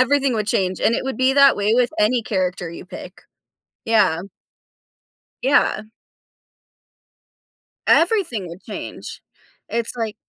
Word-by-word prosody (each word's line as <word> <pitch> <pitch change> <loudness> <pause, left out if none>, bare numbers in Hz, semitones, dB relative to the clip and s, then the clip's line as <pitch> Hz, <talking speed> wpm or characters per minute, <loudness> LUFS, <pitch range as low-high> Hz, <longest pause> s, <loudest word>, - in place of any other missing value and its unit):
Everything 275 0 +2
would 215 -2 -2
change, 185 -3 0
and 230 - +2
it - - -2
would 265 -4 -4
be 260 +1 +3
that 280 -1 +6
way 205 +2 +1
with 245 -1 +2
any 230 +3 +2
character 185 -4 -2
you 170 - -10
pick, 185 0 -10 0.7
yeah. 195 -7 +2 1.2
Yeah. 265 -4 +2 2.0
Everything 330 - +2
would 170 +3 -11
change. - - -8 0.5
It's 230 0 0
like 225 -3 -3
225 Hz, 125 wpm, -20 LUFS, 190-260 Hz, 2.0 s, that